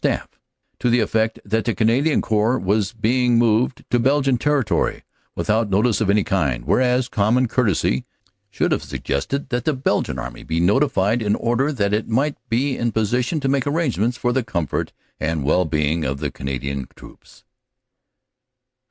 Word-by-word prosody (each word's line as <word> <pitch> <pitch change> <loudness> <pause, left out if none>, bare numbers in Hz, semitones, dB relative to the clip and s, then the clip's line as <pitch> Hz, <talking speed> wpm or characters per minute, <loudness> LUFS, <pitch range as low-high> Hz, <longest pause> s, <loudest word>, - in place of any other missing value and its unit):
staff - - 0 0.5
to 125 - +1
the 120 +1 +3
effect 110 0 0
that 110 +2 0
the 115 - -1
Canadian 125 +7 +2
Corps 110 +3 +1
was 100 0 0
being 120 +2 +1
moved 115 +2 +1
to 120 - +3
Belgian 135 +1 +2
territory 140 -6 0 0.3
without 110 0 0
notice 105 +4 +2
of 105 - +1
any 105 0 +3
kind, 70 - -1
whereas 125 0 +2
common 120 +3 +2
courtesy 100 - +1 0.5
should - - -1
have - - +1
suggested 135 - -3
that 120 -3 -1
the 155 - +1
Belgian 130 0 -1
Army - - -6
be 80 +2 -2
notified 105 - +2
in 105 -2 +1
order 120 +5 0
that 105 -7 -1
it 105 +1 0
might 140 +6 +1
be 130 +4 +1
in 120 - -1
a - - 0
position 125 - 0
to 135 - -1
make 135 0 +1
arrangements 130 - 0
for 120 0 0
the 130 0 +1
comfort 85 -8 -2 0.3
and 80 -2 -1
well 90 +6 +2
being 80 +1 0
of 70 0 -2
the - - -3
Canadian 65 0 -4
troops. - - -16
115 Hz, 170 wpm, -21 LUFS, 95-125 Hz, 0.5 s, the